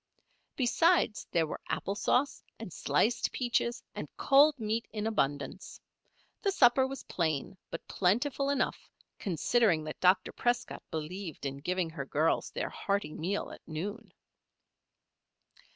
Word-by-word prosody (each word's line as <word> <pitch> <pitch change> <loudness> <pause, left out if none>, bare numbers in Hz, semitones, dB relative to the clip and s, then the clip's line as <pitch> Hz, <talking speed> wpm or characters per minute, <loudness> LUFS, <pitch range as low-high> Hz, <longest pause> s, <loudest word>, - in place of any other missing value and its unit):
Besides, 280 -1 +2
there 165 -1 +2
were 155 - -6
apple 200 - -1
sauce 250 +6 +1 0.2
and 220 -7 -8
sliced 180 +14 +1
peaches 240 -1 0
and - - -6
cold 285 +2 +6
meat 220 +1 -1
in 215 -1 -3
abundance. 145 -4 -2 0.6
The 400 - +1
supper 260 -5 +5
was 270 0 -7
plain, 160 0 -1
but 165 - -7
plentiful 250 +9 +1
enough, 280 -1 -1 0.3
considering 190 -1 +2
that 155 0 -6
Dr. 185 +1 +4
Prescott 245 0 -1
believed 160 +1 -5
in 135 0 -3
giving 180 +3 -1
her 145 -4 -5
girls 155 +4 +1
their - - -3
hearty 200 -5 -1
meal 190 +6 -2
at - - -11
noon. 190 +8 -5
200 Hz, 130 wpm, -31 LUFS, 160-245 Hz, 0.6 s, cold